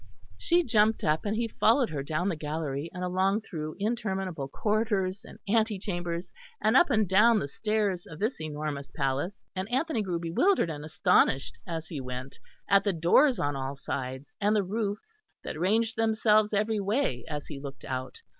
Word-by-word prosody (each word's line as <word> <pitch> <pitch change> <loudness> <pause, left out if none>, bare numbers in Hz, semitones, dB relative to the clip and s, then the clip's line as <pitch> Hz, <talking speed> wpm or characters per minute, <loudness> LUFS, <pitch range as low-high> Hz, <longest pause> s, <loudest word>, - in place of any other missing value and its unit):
She 345 +1 +2
jumped 220 -4 +3
up, 155 +4 +1
and 205 +1 0
he 230 +1 0
followed 230 - +3
her 145 -3 -2
down 155 +6 -1
the 175 - -1
gallery, 150 -1 -3
and 180 0 -6
along 190 +3 +1
through 155 -6 -6
interminable 195 - -2
corridors 205 - 0
and - - -12
ante 220 0 +2
chambers, 175 -2 -4 0.3
and 215 +3 +2
up 345 +4 +6
and 220 -5 +2
down 215 +5 +5
the 165 - -1
stairs 205 +1 -1
of 160 - -9
this 215 - -2
enormous 150 -3 -4
palace; 140 +9 -2
and 190 +2 -3
Anthony 265 -1 0
grew 180 -4 -2
bewildered 170 - +2
and 150 -1 -6
astonished 145 -3 +2
as 165 -2 -4
he 150 -5 -4
went 125 +1 -7 0.3
at 200 0 +5
the 200 - +1
doors 205 - +4
on 145 0 0
all 135 +1 -3
sides, 130 0 -5
and 205 +2 +3
the 205 - +3
roofs 220 - -4 0.2
that - - -5
ranged 220 +5 +2
themselves 220 -1 +3
every 215 +1 +1
way 200 - 0
as 150 -2 -4
he 145 -3 -7
looked 135 -3 -9
out. 130 - -5
190 Hz, 180 wpm, -28 LUFS, 150-220 Hz, 0.3 s, up